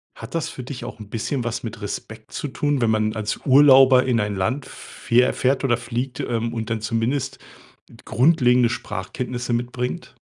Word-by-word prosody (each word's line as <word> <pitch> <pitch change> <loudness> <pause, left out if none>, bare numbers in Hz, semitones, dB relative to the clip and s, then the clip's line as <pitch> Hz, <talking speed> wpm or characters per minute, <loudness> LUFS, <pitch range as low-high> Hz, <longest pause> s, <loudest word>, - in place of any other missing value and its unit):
Hat - - -10
das 165 - -1
für 130 - -8
dich 130 0 -7
auch 110 - -8
'n 105 - -9
bisschen 120 +4 -2
was 120 -1 -3
mit 115 -1 -7
Respekt 110 +2 -7
zu 145 - -4
tun, 145 +1 -1
wenn 115 - +3
man 110 0 +1
als 110 -1 -3
Urlauber 135 -1 +7
in 125 -3 +1
ein 105 -1 -2
Land 130 +9 -1
fähr 125 +2 0
fährt 135 +2 0
oder 120 -2 +3
fliegt, 125 +2 -4
ähm, 115 -1 -2
und 115 -1 -4
dann 110 -2 -1
zumindest 120 +5 -1 0.7
grundlegende 125 -4 +3
Sprachkenntnisse 120 +3 -4
mitbringt? 125 +1 -4
120 Hz, 175 wpm, -22 LUFS, 115-130 Hz, 0.7 s, Urlauber